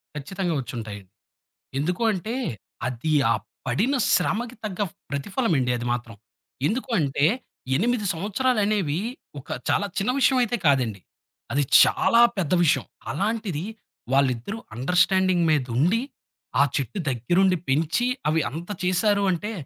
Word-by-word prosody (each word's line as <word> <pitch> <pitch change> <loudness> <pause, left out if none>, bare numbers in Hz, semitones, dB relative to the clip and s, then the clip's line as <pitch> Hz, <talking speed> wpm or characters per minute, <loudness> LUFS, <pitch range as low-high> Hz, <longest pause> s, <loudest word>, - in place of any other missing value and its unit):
ఖచ్చితంగా 175 +5 -3
వచ్చుంటాయి. 110 -4 -6 0.8
ఎందుకు 175 +9 -1
అంటే, 210 +5 -4 0.5
అది 125 +5 -2 0.2
ఆ - - +2 0.3
పడిన 250 +8 +1 0.2
శ్రమకి 230 +7 0
తగ్గ 210 -2 -4 0.3
ప్రతిఫలం 190 - -1
అండి 125 -1 +1
అది 120 - -4
మాత్రం. 120 -3 -5 0.5
ఎందుకు 255 - -2
అంటే, 140 -1 +2 0.5
8 225 - +1
సంవత్సరాలనేవి 205 - 0 0.4
ఒక - - -19 0.2
చాలా 205 - +2
చిన్న 200 +6 +1
విషయం 265 0 +4
అయితే 240 0 0
కాదండి. 125 -8 +2 0.5
అది 145 +1 +2 0.2
చాలా 235 - +4 0.2
పెద్ద 175 -5 -1
విషయం. 155 - +2 0.3
అలాంటిది 200 -2 -2 0.5
వాళ్ళిద్దరూ 135 - +1 0.2
అండర్‌స్టాడింగ్ 180 - +2
మీదుండి, 150 - +2 0.6
ఆ - - +8
చెట్టు 140 - -2
దగ్గరుండి 175 +11 +2
పెంచి, 160 - +1 0.2
అవి 160 +1 +2
అంత 165 +5 -7 0.2
చేశారు 200 +3 +2
అంటే 205 +6 -3
175 Hz, 120 wpm, -24 LUFS, 140-210 Hz, 0.8 s, ఆ